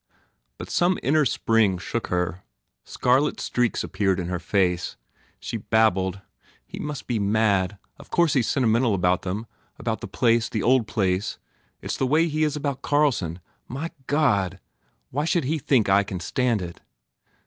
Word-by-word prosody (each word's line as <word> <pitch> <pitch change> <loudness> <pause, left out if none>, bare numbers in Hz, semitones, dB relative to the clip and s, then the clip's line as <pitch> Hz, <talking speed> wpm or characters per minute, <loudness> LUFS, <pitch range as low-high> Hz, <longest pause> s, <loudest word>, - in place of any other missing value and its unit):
But - - -8
some 175 +1 +2
inner 150 +2 +3
spring 115 -5 +2
shook 115 +6 -4
her. 90 0 -1 0.4
Scarlet 130 +4 +1
streaks 120 -2 0
ap - - -7
peared 95 -1 +1
in 90 -1 -3
her 90 -1 -2
face. 90 -2 0 0.4
She - - -4
babbled, 100 -3 +1 0.4
"He - - -9
must 150 -3 -5
be 120 -3 -1
mad! 100 -2 +1 0.2
Of - - -14
course 170 -3 +3
he 135 - +3
s 115 - 0
sentimental 115 -3 +2
about 90 0 +2
them 100 +5 -4 0.3
about - - -3
the - - -5
place 115 -1 +2
the 110 - -2
old 125 -2 +3
place 95 0 -1 0.5
It - - -3
s - - -2
the 130 - 0
way 160 +5 +3
he 155 0 0
is 150 -1 +1
about 140 -2 -3
Carlson! 120 - +1 0.3
My 145 +7 -5 0.2
God, 100 - +1 0.5
why 145 +4 -1
should 170 0 +1
he 155 +4 -1
think 130 -5 +2
I 100 +1 +5
can 95 -2 -5
stand 115 +2 0
it!" 85 -1 -8
110 Hz, 170 wpm, -24 LUFS, 95-140 Hz, 0.5 s, I